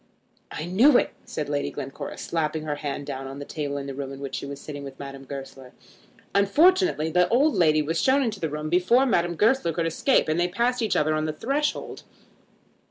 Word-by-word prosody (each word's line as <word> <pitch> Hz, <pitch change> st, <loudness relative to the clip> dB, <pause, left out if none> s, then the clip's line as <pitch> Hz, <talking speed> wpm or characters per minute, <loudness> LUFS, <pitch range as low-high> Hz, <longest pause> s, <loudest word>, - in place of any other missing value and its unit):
"I 155 Hz, -, -5 dB
knew 240 Hz, +10 st, +5 dB
it," -, -, +1 dB
said 150 Hz, -, -4 dB
Lady 145 Hz, -1 st, -1 dB
Glencora, 135 Hz, +1 st, -7 dB
slapping 160 Hz, -1 st, -2 dB
her 150 Hz, -1 st, -3 dB
hand 145 Hz, -1 st, -4 dB
down 135 Hz, -1 st, -5 dB
on 135 Hz, +1 st, -8 dB
the 145 Hz, -, -7 dB
table 145 Hz, -2 st, -4 dB
in 140 Hz, -, -5 dB
the 140 Hz, -, -5 dB
room 135 Hz, 0 st, -5 dB
in 135 Hz, -, -8 dB
which 140 Hz, -1 st, -6 dB
she -, -, -4 dB
was 140 Hz, 0 st, -7 dB
sitting 145 Hz, -1 st, -8 dB
with 135 Hz, -1 st, -9 dB
Madame 135 Hz, -1 st, -8 dB
Goesler. 135 Hz, -1 st, -9 dB, 0.6 s
Unfortunately 285 Hz, -, +3 dB
the 180 Hz, +1 st, +3 dB
old 280 Hz, +5 st, +3 dB
lady 155 Hz, -3 st, +3 dB
was 165 Hz, +2 st, -1 dB
shown 275 Hz, +1 st, +3 dB
into 220 Hz, -5 st, -2 dB
the 160 Hz, -, -2 dB
room 150 Hz, +1 st, -4 dB
before 185 Hz, +10 st, +3 dB
Madame 175 Hz, -8 st, +1 dB
Goesler 215 Hz, -2 st, +2 dB
could 170 Hz, +1 st, -1 dB
escape, 165 Hz, -, +2 dB
and 155 Hz, +2 st, 0 dB
they 175 Hz, -, +2 dB
passed 240 Hz, +7 st, 0 dB
each 220 Hz, -, 0 dB
other 155 Hz, +1 st, +2 dB
on 155 Hz, 0 st, 0 dB
the 155 Hz, -, -2 dB
threshold. 275 Hz, -, -2 dB
155 Hz, 215 wpm, -25 LUFS, 140-215 Hz, 0.6 s, knew